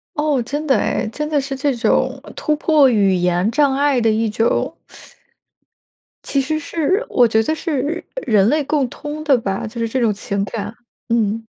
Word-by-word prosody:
哦， 295 -4 +1
真 290 +6 -4
的 270 -3 +3
诶， - - -1
真 300 +5 -3
的 295 -2 +1
是 270 0 -4
这 280 -1 0
种 255 +3 0 0.2
突 305 - 0
破 300 -3 +4
语 200 -5 +3
言 180 +3 +1
障 280 +2 +2
碍 280 -2 +2
的 225 -1 +2
一 220 +1 +1
种 225 +2 0 1.5
······其 275 - +1
实 310 +4 -1
是 340 +9 -1
我 245 -2 +4
觉 220 0 +2
得 310 - 0
是 310 0 -2 0.2
人 210 -1 +3
类 300 0 +1
共 280 -3 0
通 300 +3 -7
的 280 -4 +4
吧， 195 -2 -3
就 235 +2 -8
是 230 - 0
这 255 +3 -2
种 225 -3 +3
情 200 0 -3
感， 205 +1 -5 0.4
嗯。 225 -1 0
260 Hz, 195 characters per minute, -19 LUFS, 220-295 Hz, 1.5 s, 破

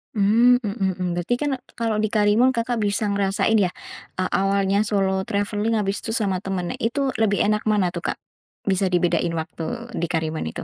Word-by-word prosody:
Mmm, 235 +5 +4
mhm, 200 -2 -1
mmm. 180 -1 -2
Berarti 175 +8 0
kan 290 +3 -1 0.2
kalau 225 -2 -1
di 215 - +2
Karimun 215 +4 +3
Kakak 235 0 -1
bisa 205 0 0
ngerasain 200 +2 +1
ya, 185 -3 +2 0.4
eee, 185 0 -1
awalnya 195 0 +2
solo 190 -2 0
travelling, 205 +2 0
habis 200 -2 0
itu 225 - -4
sama 195 -5 0
temennya. 185 -2 -3
Itu 265 +4 0
lebih 205 -2 +2
enak 210 +1 +1
mana 205 -4 +2
tuh, - - -3
Kak? - - -25 0.5
Bisa 190 -1 +1
dibedain 175 -1 +1
waktu 180 +9 -5
di 170 - -1
Karimun 160 - -2
itu? 80 - -6
205 Hz, 180 wpm, -23 LUFS, 190-225 Hz, 0.5 s, Mmm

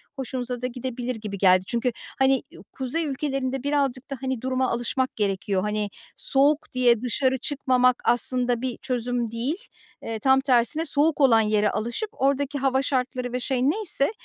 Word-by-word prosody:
hoşunuza 250 -2 -4
da 250 - -1
gidebilir 250 0 -4
gibi 210 -2 -6
geldi. 185 -1 +4
Çünkü, 240 +1 0 0.3
hani, 265 -1 +3
iii, - - -14
kuzey 270 +6 -2
ülkelerinde 270 -2 -2
birazcık 275 -3 -1
da, 275 - -3
hani, 260 -3 -2
duruma 260 0 0
alışmak 245 +2 -1
gerekiyor. 195 -2 -1
Hani, 210 0 -1 0.3
soğuk 285 +3 +1
diye 240 -3 +3
dışarı 260 +2 +1
çıkmamak 255 -2 +1
aslında 245 0 +1
bir 255 -2 -3
çözüm 245 -2 -2
değil. 245 +8 -2 0.5
Eee, 225 -1 -4
tam 265 +3 +4
tersine 265 +4 +2
soğuk 295 +1 +2
olan 235 -5 +6
yere 210 -1 +2
alışıp 240 - -3
oradaki 280 +1 +1
hava 265 0 +2
şartları 255 -2 -2
ve 250 - -1
şey 255 0 -1
neyse, 335 0 +3
255 Hz, 160 wpm, -25 LUFS, 235-270 Hz, 0.5 s, olan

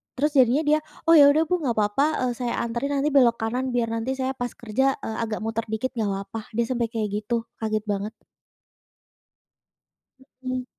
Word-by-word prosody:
terus 295 +3 +1
jadinya 260 +5 +4
dia, 300 +1 +3 0.2
"Oh, 330 - +3
ya 285 - +9
udah, 305 +3 +4
Bu, 360 +2 0
nggak 255 -7 -1
apa-apa, 210 +6 +2 0.3
eee, - - -3
saya 240 -1 -1
anterin 240 +5 -2
nanti 285 +2 +1
belok 250 -4 +5
kanan 250 +3 -2
biar 230 -2 0
nanti 230 +4 -2
saya 260 0 -1
pas 245 -2 -5
kerja, 265 +4 0
eee, 220 - -4
agak 220 -2 -3
muter 225 0 -3
dikit 220 +4 -2
nggak 225 -5 -2
apa-apa," 200 +3 -6
dia 235 - +2
sampai 235 -1 -1
kayak 225 -2 -2 0.2
gitu 235 -1 0 0.2
kaget 215 -1 -1
banget. 205 +1 -3 2.3
Mhm. 255 0 -3
240 Hz, 185 wpm, -24 LUFS, 225-265 Hz, 2.3 s, ya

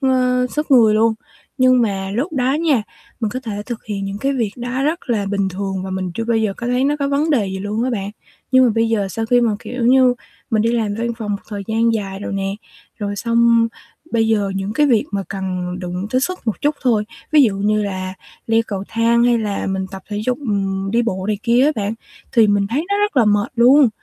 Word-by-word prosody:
ơ, 250 -2 +2
sức 300 0 -3
người 230 -5 +6
luôn, 220 +1 +3 0.4
nhưng 255 -1 +5
mà 195 -3 -2
lúc 285 - -1
đó 260 -2 +1
nha, 300 -7 +2 0.4
mình 220 -3 -1
có 255 - -4
thể 210 -5 -5
thực 240 -3 -6
hiện 200 -2 -4
những 195 +1 -4
cái 275 +5 0
việc 235 -6 -1
đó 245 +2 -3
rất 305 -1 -1
là 210 -4 0
bình 200 -1 0
thường 190 0 -4
và 190 - -5
mình 185 -1 -3
chưa 230 - -2
bao 235 0 +1
giờ 215 -3 0
có 235 - -5
thấy 250 +2 +1
nó 290 +2 +1
có 280 -1 0
vấn 290 +3 +1
đề 235 -9 +2
gì 190 0 -4
luôn 205 +3 -2
á 260 - 0
bạn. 200 -4 -3 0.4
Nhưng 260 0 +6
mà - - +3
bây 225 0 +2
giờ 210 -3 0
sau 225 +4 -3
khi 245 +1 +4
mà, 235 -2 +2
kiểu 250 +2 -6
như, 255 0 +5 0.4
mình 215 -1 +2
đi 230 +1 +1
làm 220 -3 0
văn 235 0 -1
phòng 215 -3 -4
một 200 0 -3
thời 205 -2 -5
gian 230 +1 +2
dài 195 -3 -3
rồi - - -5
nè, 195 0 -2 0.5
rồi 205 -1 -3
xong 230 +1 +3 0.4
bây 225 -1 +2
giờ 205 -3 +1
những 195 +1 -3
cái 295 +6 +3
việc 235 -6 +3
mà 200 -1 -1
cần 185 -2 -3
đụng 180 +1 -4
tới 255 - +2
sức 365 +7 -2
một 220 - -1
chút 295 +1 +1
thôi, 230 -5 +2 0.3
ví 300 -2 +7
dụ 215 -6 +2
như 210 +2 +1
là 185 -2 -4 0.3
leo 225 0 +3
cầu 195 -2 -4
thang 230 +1 +2
hay 240 -1 +3
là 210 -3 -2
mình 190 0 -2
tập 190 -1 -8
thể 205 0 -3
dục, 250 0 0
ừm, 195 -6 -2
đi 235 +3 +2
bộ 190 -5 -2
này 210 -1 -1
kia 240 +2 +3
á 300 - +4
bạn 210 0 -2 0.4
thì 230 -2 +5
mình 205 -1 +2
thấy 265 +10 -1
nó 405 0 +1
rất 415 -6 0
là 245 - +5
mệt 205 +1 +2
luôn. 255 +3 +6
225 Hz, 250 wpm, -19 LUFS, 200-250 Hz, 0.5 s, ví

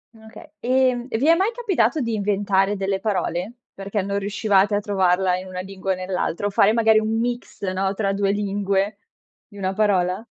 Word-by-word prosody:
Okay, 220 0 -14
ehm, 255 0 +1
e 225 - -1
vi 270 +6 +1
è 330 - +7
mai 385 +5 +2
capitato 325 - +1
di 230 -3 -2
inventare 200 -1 +1
delle 195 0 -1
parole? 195 -1 -2 0.2
Perché 195 +1 -3
non 200 +1 -2
riuscivate 205 0 +1
a - - +2
trovarla 190 -3 +1
in 185 - -9
una 185 0 -5
lingua 190 0 -3
o - - -3
nell'altra 185 0 -3
o - - +1
fare 200 +1 +4
magari 220 -1 +4
un 220 +1 -1
mix 240 -2 -4
no, 190 0 -1
tra 195 -2 0
2 200 0 0
lingue, 200 0 -1 0.5
di 205 - -15
1 190 0 -2
parola? 190 -1 +1
200 Hz, 190 wpm, -22 LUFS, 190-220 Hz, 0.5 s, è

